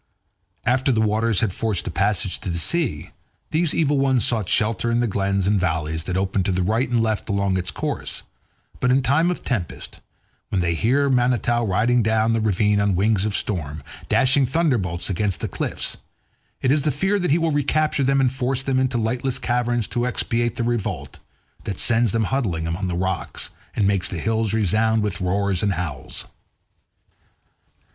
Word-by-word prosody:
After 130 +2 +2
the 115 - +1
waters 110 0 +1
had 110 -6 0
forced 110 -5 -1
a - - -3
passage 95 +1 0
to 100 - -5
the 85 - -2
sea 90 - 0 0.4
these 160 0 +1
evil 145 -3 +1
ones 130 -5 +2
sought 110 -6 +1
shelter 115 +2 +2
in 115 0 +1
the 120 - +2
glens 100 -2 0
and 100 0 +2
valleys 80 -2 -2
that 90 +1 -2
open 95 +1 0
to 95 0 0
right 110 +7 0
and 120 -2 +2
left 110 0 -2
along 100 -2 0
its 95 0 -1
course, - - -4 0.6
but 125 - +1
in 130 +1 +3
time 160 +7 +3
of 180 - -3
tempest, 100 -10 -4 0.5
when 95 - 0
they 85 -1 +1
hear 130 - +2
Manitou 120 -2 +2
riding 115 +5 +2
down 110 +1 +2
the 115 - +1
ravine 105 0 +2
on 100 -2 +1
wings 100 +1 +2
of 105 -2 0
storm, 75 -7 -3 0.3
dashing 135 0 +3
thunderbolts 120 - 0
against 100 -1 -1
the - - -3
cliffs, - - -3 0.7
it 130 - +3
is 150 +1 +3
the 150 - 0
fear 195 +8 0
that 180 -2 -1
he 150 - +4
will 165 -1 0
recapture 145 0 +1
them 135 +1 +2
and 130 -1 +2
force 135 0 -1
them 135 -1 +1
into 130 -2 0
lightless 120 +3 -1
caverns 120 -2 0
to 120 +1 -1
expiate 120 -1 -1
their 115 - -2
revolt, 120 -3 -3 0.5
that 100 - -4
sends 115 -2 +4
them 115 +1 +1
huddling 100 -10 -1
among 85 +4 -2
the 85 -1 -2
rocks 95 0 -3 0.2
and 105 - +1
makes 100 -2 +1
the 95 - -4
hills 110 +3 0
resound 110 +1 +2
with 105 -2 -2
roars 95 0 0
and 100 -2 +1
howls. 80 -7 -4
110 Hz, 185 wpm, -22 LUFS, 95-125 Hz, 0.7 s, he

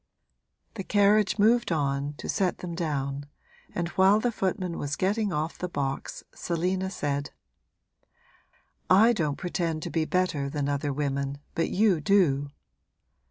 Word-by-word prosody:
The 195 - -5
carriage 205 +1 +3
moved 225 +1 +3
on, 140 -2 0
to - - -7
set 185 -2 0
them 175 -2 -6
down, 145 -4 -3 0.5
and 170 -1 -1
while 190 +4 +4
the 245 +2 0
footman 185 -4 -2
was 145 +1 -2
getting 205 +3 0
off 155 +1 -3
the 180 - -3
box 135 -4 -4
Selina 185 +3 -1
said: 145 -6 -2 1.6
'I 220 +6 +6
don't 155 -9 -1
pretend 170 -3 -2
to - - -5
be 160 +1 0
better 160 -6 0
than 145 -1 -2
other 145 0 -1
women, 140 0 -2 0.2
but 165 - 0
you 195 -5 +2
do!' 145 -7 +3
170 Hz, 140 wpm, -27 LUFS, 145-190 Hz, 1.6 s, I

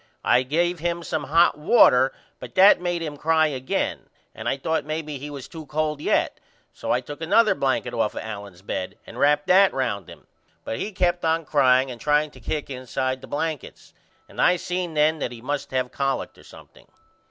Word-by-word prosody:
I 125 - +4
gave 170 +6 0
him 170 +1 -2
some 160 -1 -3
hot 165 +1 +3
water 135 - +5 0.3
but 125 -2 -10
that 190 -1 +7
made 175 -1 -2
him 150 -2 -5
cry 160 +1 +3
again 130 -2 -3 0.2
and - - -4
I 135 - -1
thought 160 +3 -1
maybe 155 -1 -4
he 145 +2 -7
was 140 -3 -8
to 160 -3 -10
cold 150 0 -2
yet - - 0 0.3
so - - -7
I 125 - +2
took 145 +5 -9
another 210 +7 +4
blanket 130 -4 -1
off 110 -2 -1
of - - -5
Allen's 100 -4 -8
bed 95 -2 -4
and - - -10
rapped 150 +1 +3
that 195 +1 +5
round 125 -7 -2
him - - -14 0.4
but 115 - -4
he 210 - -3
kept 175 -2 0
on 165 0 +1
crying 130 -2 +3
and 120 - -10
trying 150 0 +2
to - - -15
kick 150 -2 -4
inside 130 0 -3
the - - -11
blankets. 150 0 -5 0.3
And - - -5
I 180 - +5
seen 180 -2 -3
then 155 +1 +3
that 125 - -3
he 120 - -9
must 145 +4 -4
have 130 -1 -2
collect 135 -1 -2
or - - -16
something. - - -16
150 Hz, 200 wpm, -24 LUFS, 130-165 Hz, 0.4 s, that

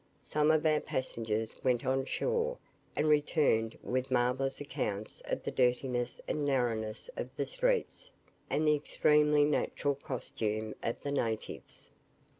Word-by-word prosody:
Some 150 0 +2
of 155 0 +3
our 155 -1 +4
passengers 115 -5 -2
went 125 -2 +2
on 130 +1 +1
shore, 475 - 0 0.4
and 150 - +1
returned 145 -7 +3
with 130 +1 -1
marvellous 130 +2 +1
accounts 110 -7 -4
of - - -2
the - - -2
dirtiness 125 -1 +1
and 150 - -1
narrowness 120 -6 0
of - - -4
the - - -1
streets, - - -1 0.4
and 155 +1 +1
the 150 - +6
extremely 150 0 +4
NATURAL 145 -1 +1
costume 110 -5 -3
of 115 - -2
the 140 - -2
natives. 115 -6 -3
135 Hz, 135 wpm, -32 LUFS, 120-150 Hz, 0.4 s, the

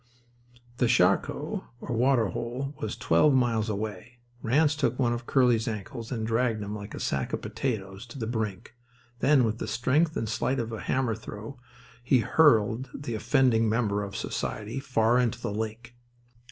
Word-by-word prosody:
The 125 - +2
charco, 120 - +1
or 120 - -4
water 120 -3 +3
hole, 125 - -4
was 110 - -3
twelve 130 - +4
yards 115 -3 +1
away. 105 +2 -5 0.3
Ranse 150 +6 +3
took 130 -4 0
one 120 -3 +2
of 120 0 -5
Curly's 125 -3 +3
ankles 115 +2 -5
and 115 -3 -2
dragged 115 -1 0
him 100 +1 -5
like 105 0 -7
a - - -6
sack 70 -1 -2
of - - -1
potatoes 100 -4 -4
to 120 - -10
the 115 - -3
brink. 110 -3 -3 0.5
Then 135 -1 +4
with 110 -1 -1
the - - -4
strength 145 +7 +1
and 115 - -2
sleight 120 +4 -1
of 115 -2 -3
a 110 - -5
hammer 130 -3 0
throw 110 +3 -8 0.4
he 125 0 +3
hurled 120 -4 +3
the 135 -4 -5
offending 115 0 +3
member 105 -2 +1
of 100 -1 -6
society 110 +5 -3
far 125 -3 +2
into 125 -1 0
the 105 - -3
lake. 110 +3 -5
115 Hz, 170 wpm, -27 LUFS, 110-125 Hz, 0.5 s, twelve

